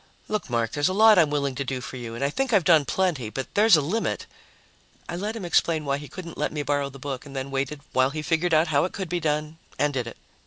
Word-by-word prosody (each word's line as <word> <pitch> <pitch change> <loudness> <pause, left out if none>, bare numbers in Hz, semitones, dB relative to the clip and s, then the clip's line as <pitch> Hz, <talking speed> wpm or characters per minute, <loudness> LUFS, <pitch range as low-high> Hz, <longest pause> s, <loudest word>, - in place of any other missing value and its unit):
"Look, 215 -8 -3
Mark, 115 -2 0
there's 145 +2 +1
a 185 - 0
lot 215 -1 +7
I'm 160 -3 +4
willing 140 -2 -1
to 135 +2 -3
do 130 -1 -3
for 125 - -8
you, 120 -2 -6
and 120 - -4
I 140 - +1
think 270 - -1
I've 200 -4 +5
done 160 -4 +5
plenty, 160 - 0
but 130 +4 -6
there's 210 -3 +6
a - - +2
limit 190 +11 -2 0.4
" - - -33
I 170 - -4
let 210 +5 -3
him 215 -5 -5
explain 165 -2 +2
why 140 0 0
he 145 - -9
couldn't 170 -1 -9
let - - 0
me 150 -1 -3
borrow 145 0 0
the 135 - -12
book 135 -1 -5
and 140 -2 -11
then 135 +1 -4
waited 140 +2 -2
while 130 +1 +3
he 155 +2 -5
figured 165 +2 +1
out 160 +1 +4
how 145 -2 +3
it 185 - -5
could 190 -3 -5
be 175 - -1
done 155 0 -2 0.2
and 145 0 +1
did 125 -3 -2
it. 115 - -9
150 Hz, 280 wpm, -25 LUFS, 135-175 Hz, 0.4 s, lot